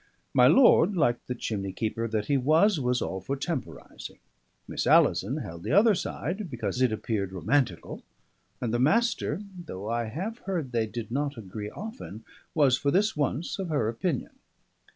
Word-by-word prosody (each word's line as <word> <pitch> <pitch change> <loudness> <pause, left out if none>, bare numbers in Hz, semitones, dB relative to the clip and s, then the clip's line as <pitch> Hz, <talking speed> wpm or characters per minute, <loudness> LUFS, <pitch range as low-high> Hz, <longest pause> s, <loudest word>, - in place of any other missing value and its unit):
My - - +6
lord, 210 -7 +6
like 120 -8 +1
the 125 - -3
chimney 100 -5 -3
keeper 115 +3 -2
that 110 -2 -1
he 145 - +1
was, 155 +8 +3
was 125 -1 0
all 95 0 -4
for 135 +9 -3
temporising. 150 0 -6 0.5
Miss - - -3
Alison 120 +10 +4
held 85 - -7
the 135 - -2
other 210 +4 +6
side, 185 +1 -4
because 120 -2 -3
it 130 -3 +4
appeared 105 -3 -2
romantical; 95 - -1 0.6
and 120 -2 -2
the 120 - +1
Master 180 - +1
(though 105 - -7
I 120 0 0
have 190 - -5
heard 165 -9 -2
they 115 -2 0
did 115 0 -6
not 140 +1 -2
agree 105 0 -6
often) 205 - -8 0.3
was 140 -5 +4
for 140 - +1
this 205 +7 +2
once 150 +5 -2
of 190 -3 -3
her 145 -8 +1
opinion. 130 +5 -2
130 Hz, 170 wpm, -27 LUFS, 110-165 Hz, 0.6 s, My